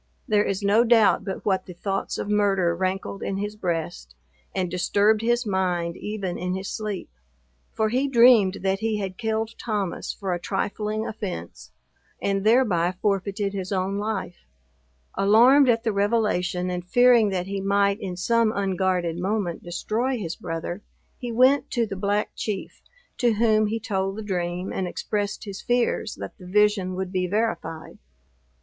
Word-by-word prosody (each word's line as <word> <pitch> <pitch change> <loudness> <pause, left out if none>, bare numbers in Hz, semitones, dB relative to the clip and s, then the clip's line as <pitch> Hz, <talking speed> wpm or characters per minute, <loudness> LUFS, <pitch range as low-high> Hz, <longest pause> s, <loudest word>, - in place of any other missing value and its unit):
There 210 -3 +3
is 195 0 -2
no 205 +4 +4
doubt 225 -4 +4
but 190 - -5
what 190 -2 0
the 180 - -9
thoughts 195 +2 -3
of - - -4
murder 195 -4 +2
rankled 190 +2 -3
in 195 - -2
his 205 +1 -3
breast, 165 - -4 0.4
and 185 -1 0
disturbed 200 +4 +2
his 240 +1 +1
mind 180 -4 -1
even 200 -4 -4
in 180 +1 -2
his 190 0 -5
sleep; 210 -4 -4 0.6
for 220 -1 0
he 260 +5 +1
dreamed 235 -6 +5
that 195 0 +1
he 220 0 -1
had 190 -2 -5
killed 220 0 -1
Thomas 205 -6 -2
for 195 -3 -3
a 175 - -2
trifling 210 +3 -2
offence, 190 - -6 0.5
and 195 -1 -1
thereby 210 -7 +3
forfeited 200 0 -1
his 190 -1 -4
own 195 +1 -1
life. 205 - -4 0.7
Alarmed 245 +7 +5
at 230 -1 +2
the 220 - 0
revelation, 200 -4 0
and 180 -1 -3
fearing 240 +2 +5
that 185 -2 -2
he 195 0 -4
might 200 +1 +2
in 185 -2 -5
some 230 +4 +2
unguarded 185 -3 0
moment 190 -2 -2
destroy 225 +9 -2
his 170 -6 -4
brother, 165 +3 -5 0.4
he 245 -2 -4
went 255 +4 +4
to 235 -2 0
the 200 -2 -6
Black 205 +2 0
Chief, 205 -3 -5 0.4
to 240 -2 +3
whom 215 -1 +3
he 225 +2 -2
told 195 -3 -2
the 220 - -6
dream, 180 -2 -3
and 185 - -2
expressed 205 +3 -3
his 200 -2 -7
fears 245 0 0
that - - -8
the 180 - -11
vision 205 -1 +2
would 185 0 -4
be 185 -1 0
verified. 180 -6 -3
200 Hz, 165 wpm, -24 LUFS, 185-220 Hz, 0.7 s, dreamed